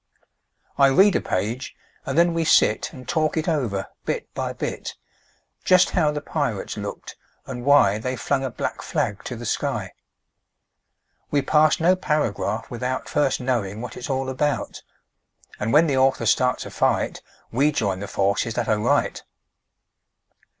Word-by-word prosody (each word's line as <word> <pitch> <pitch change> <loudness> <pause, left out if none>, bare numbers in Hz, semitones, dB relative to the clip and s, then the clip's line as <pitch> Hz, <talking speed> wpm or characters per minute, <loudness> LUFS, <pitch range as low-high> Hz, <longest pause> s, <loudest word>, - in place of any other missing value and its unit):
I 140 - +7
read 190 +9 +5
a - - +2
page, 110 +7 -3 0.3
and 135 - -2
then 170 0 +4
we 165 0 0
sit 110 -8 +3
And 130 -1 -12
talk 155 0 0
it 160 - -1
over, 120 - -1 0.2
bit - - -4
by - - -3
bit; - - -5 0.7
Just 185 -1 +5
how 165 -5 +2
the 150 0 -3
pirates - - -3
looked, - - -7 0.3
and 125 -2 -6
why 130 -7 +5
They 130 +3 -3
flung 135 +4 -1
a 135 - -1
black - - -4
flag 100 - -2
to 125 - -4
the 120 +1 -8
sky. - - -2 1.4
We 145 -2 +1
pass 155 0 +3
no 175 +3 +4
paragraph 130 - -1
without 125 +2 -3
First 140 -3 +1
knowing 115 -6 -2
what 120 -1 -7
it's 125 - -7
all 135 0 -1
about, 135 +2 -2 0.8
And 110 +2 -1
when 155 +3 +6
the 140 -4 0
author 130 0 +2
starts 125 -1 +2
a - - -8
fight - - 0 0.3
We 140 +6 +3
join 100 -9 -1
the 100 - -5
forces 100 +4 0
that 120 - -1
are 105 -1 +2
right. - - +1
130 Hz, 160 wpm, -23 LUFS, 115-150 Hz, 1.4 s, I